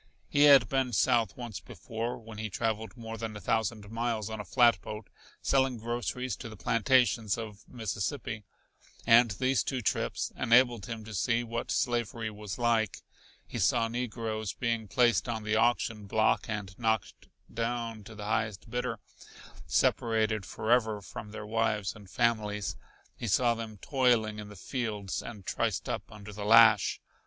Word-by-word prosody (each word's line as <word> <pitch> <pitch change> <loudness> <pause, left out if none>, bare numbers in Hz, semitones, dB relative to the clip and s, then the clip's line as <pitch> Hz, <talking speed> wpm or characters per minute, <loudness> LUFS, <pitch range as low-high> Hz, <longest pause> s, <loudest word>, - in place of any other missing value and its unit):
He 145 0 +4
had 140 -4 +8
been 135 -2 0
south 110 +2 +2
once 120 -5 -6
before, 115 +2 -5
when 110 -2 -10
he 110 0 -3
traveled 110 +3 -2
more 115 -1 -7
than 110 -1 -4
a - - -7
thousand 110 -1 -1
miles 115 -2 -2
on 110 - -5
a - - -4
flatboat 115 -3 +2 0.3
selling 130 -2 +2
groceries 120 +2 -3
to 115 - -7
the 110 - -10
plantations 115 -1 +2
of 110 -2 -8
Mississippi, 110 0 -3 0.6
and 115 +1 +7
these 130 +3 +1
two 130 - -2
trips - - -1
enabled 120 -1 +3
him 115 -2 -6
to 110 - -8
see 115 +4 +1
what 115 0 -4
slavery 115 -2 -1
was 105 -3 -7
like. 115 -2 +1 0.4
He - - -6
saw 115 - +3
negroes 115 -3 -3
being 115 -2 -2
placed 120 -3 +2
on 110 -2 -2
the 105 +1 0
auction 110 -2 +1
block 110 +2 +2
and 100 -3 -4
knocked 110 -4 -1 0.3
down 115 -2 -3
to 110 - -11
the 105 -1 -7
highest 110 0 -2
bidder, 125 0 -2 0.7
separated 110 -3 +1
forever 110 -2 +1
from 110 +1 -8
their 105 0 -7
wives 105 -2 0
and 100 -3 -13
families. 105 - 0 0.4
He 115 - -5
saw 120 +4 +3
them 115 -2 -7
toiling 115 -3 +1
in 105 -1 -8
the 105 - -11
fields 105 -2 -3
and 105 -5 -9
triced - - -1
up - - -4
under 105 0 -10
the 105 +1 -6
lash. 110 -1 +6
110 Hz, 160 wpm, -30 LUFS, 105-120 Hz, 0.7 s, had